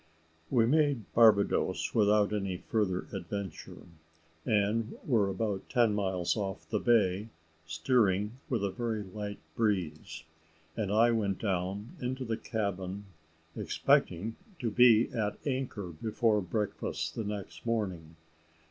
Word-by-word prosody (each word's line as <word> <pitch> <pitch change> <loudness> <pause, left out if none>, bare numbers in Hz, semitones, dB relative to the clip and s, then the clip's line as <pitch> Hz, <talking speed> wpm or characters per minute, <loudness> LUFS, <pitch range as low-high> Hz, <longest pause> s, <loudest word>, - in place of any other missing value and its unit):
We 115 -2 +4
made 145 -4 +2
Barbadoes 110 -3 +4
without 105 -1 +3
any 100 -3 -2
further 95 -2 -1
adventure, 95 -1 -6 0.6
and 110 +2 +1
were 110 -7 +2
about 100 0 -3
ten 120 -4 +3
miles 95 -4 0
off 95 -6 -4
the - - -1
bay, 105 -3 +2 0.4
steering 105 +6 +1
with 115 -6 0
a 100 - 0
very 115 -1 -2
light 100 +1 -6 0.2
breeze, 95 -6 -1 0.5
and 105 -3 -2
I 115 +3 +5
went 100 -4 0
down 100 +2 -2
into 130 +1 -3
the 115 -1 -1
cabin 100 -3 -3 0.5
expecting 105 +7 +1 0.2
to 120 -6 -2
be 120 0 +6
at 110 -5 -2
anchor 130 -9 -2
before 105 +5 0
breakfast 90 -4 -3
the 115 - -3
next 105 -2 -6
morning. 95 -8 -2
105 Hz, 120 wpm, -31 LUFS, 95-115 Hz, 0.6 s, be